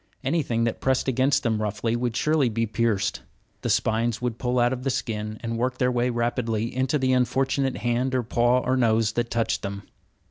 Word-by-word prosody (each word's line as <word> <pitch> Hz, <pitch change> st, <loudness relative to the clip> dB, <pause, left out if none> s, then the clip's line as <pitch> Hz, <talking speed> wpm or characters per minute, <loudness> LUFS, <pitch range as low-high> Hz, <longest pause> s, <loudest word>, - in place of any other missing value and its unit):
Anything 135 Hz, -5 st, 0 dB
that 115 Hz, -1 st, -2 dB
pressed 130 Hz, 0 st, +1 dB
against 130 Hz, +2 st, +2 dB
them 110 Hz, -2 st, 0 dB
roughly 105 Hz, +2 st, -1 dB
would 120 Hz, -1 st, -2 dB
surely 150 Hz, -2 st, +2 dB
be 115 Hz, +1 st, 0 dB
pierced; 105 Hz, -3 st, 0 dB, 0.4 s
the -, -, -2 dB
spines 115 Hz, +1 st, +1 dB
would 120 Hz, -2 st, -3 dB
pull 125 Hz, 0 st, -1 dB
out 120 Hz, +1 st, +3 dB
of 125 Hz, -, -5 dB
the 135 Hz, -, -1 dB
skin, 110 Hz, -4 st, -3 dB
and 115 Hz, 0 st, -3 dB
work 130 Hz, +1 st, -1 dB
their 125 Hz, 0 st, +2 dB
way 120 Hz, 0 st, +1 dB
rapidly 120 Hz, -1 st, -1 dB
into 130 Hz, +3 st, +1 dB
the 130 Hz, -2 st, +1 dB
unfortunate 130 Hz, +2 st, +1 dB
hand 125 Hz, +2 st, 0 dB
or 125 Hz, -, +1 dB
paw 120 Hz, +2 st, +2 dB
or 130 Hz, +1 st, 0 dB
nose 115 Hz, -3 st, +2 dB
that 120 Hz, +1 st, -2 dB
touched 115 Hz, -1 st, 0 dB
them. 100 Hz, 0 st, -5 dB
120 Hz, 200 wpm, -25 LUFS, 115-130 Hz, 0.4 s, out